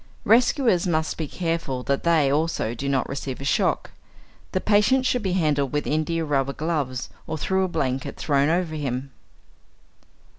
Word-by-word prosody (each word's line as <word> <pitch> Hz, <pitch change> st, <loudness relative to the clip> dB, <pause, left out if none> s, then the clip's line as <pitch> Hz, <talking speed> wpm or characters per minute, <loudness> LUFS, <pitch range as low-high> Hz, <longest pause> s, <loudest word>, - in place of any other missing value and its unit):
Rescuers 230 Hz, -, +3 dB
must 160 Hz, -2 st, 0 dB
be 160 Hz, -, -4 dB
careful 165 Hz, -7 st, -2 dB
that 140 Hz, +1 st, -1 dB
they, 160 Hz, -5 st, +3 dB
also, 150 Hz, -6 st, 0 dB
do 140 Hz, +4 st, -3 dB
not 135 Hz, -2 st, +1 dB
receive 135 Hz, -1 st, -5 dB
a -, -, -7 dB
shock. 135 Hz, -, +1 dB, 0.6 s
The 185 Hz, -, 0 dB
patient 215 Hz, +7 st, +3 dB
should 250 Hz, -1 st, +1 dB
be 190 Hz, -3 st, -1 dB
handled 150 Hz, -6 st, +1 dB
with 150 Hz, -, 0 dB
india 160 Hz, +2 st, 0 dB
rubber 140 Hz, -2 st, 0 dB
gloves 145 Hz, -5 st, -2 dB, 0.2 s
or -, -, -3 dB
through 190 Hz, +4 st, +1 dB
a -, -, -1 dB
blanket 135 Hz, -6 st, -2 dB
thrown 140 Hz, -1 st, +2 dB
over 170 Hz, -1 st, 0 dB
him. 135 Hz, -3 st, -3 dB
155 Hz, 160 wpm, -24 LUFS, 140-175 Hz, 0.6 s, Rescuers